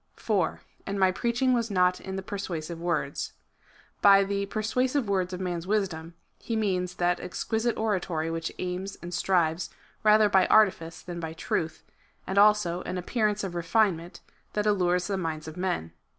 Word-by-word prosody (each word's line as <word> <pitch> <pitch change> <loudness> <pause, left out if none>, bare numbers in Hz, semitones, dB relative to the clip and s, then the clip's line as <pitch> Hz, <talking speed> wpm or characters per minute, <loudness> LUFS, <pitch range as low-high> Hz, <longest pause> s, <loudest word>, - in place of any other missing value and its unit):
4. 195 -7 -1 0.3
And 200 0 -2
my 190 -1 +5
preaching 240 +6 +1
was 235 -2 0
not 180 -2 +2
in 190 0 -6
the 190 - -4
persuasive 170 -5 -5
words. 170 -5 -2 0.7
By 200 -1 +7
the 200 0 -2
persuasive 250 +5 0
words 190 -2 0
of 180 - -5
Tnan's 175 -2 -3
wisdom, 175 -5 -1 0.2
he 230 - -3
means 185 -4 0
that 175 0 +1
exquisite 225 +6 -2
oratory 180 -7 -1
which 165 0 -3
aims 185 +2 -4
and 175 +1 -6
strives 175 -2 +1 0.3
rather 215 0 +6
by 190 -2 +4
artifice 180 -6 +3
than 175 -1 -6
by 160 -1 -5
truth, 160 0 -3 0.4
and 190 +1 +1
also 205 -4 +4
an 185 - -4
appearance 210 +2 0
of 190 -3 -4
refinement, 175 -1 0 0.3
that 210 0 0
allures 180 -3 +2
the 200 -1 -1
minds 160 -3 -4
of 155 - -7
men. 180 - -2
185 Hz, 165 wpm, -27 LUFS, 175-210 Hz, 0.7 s, By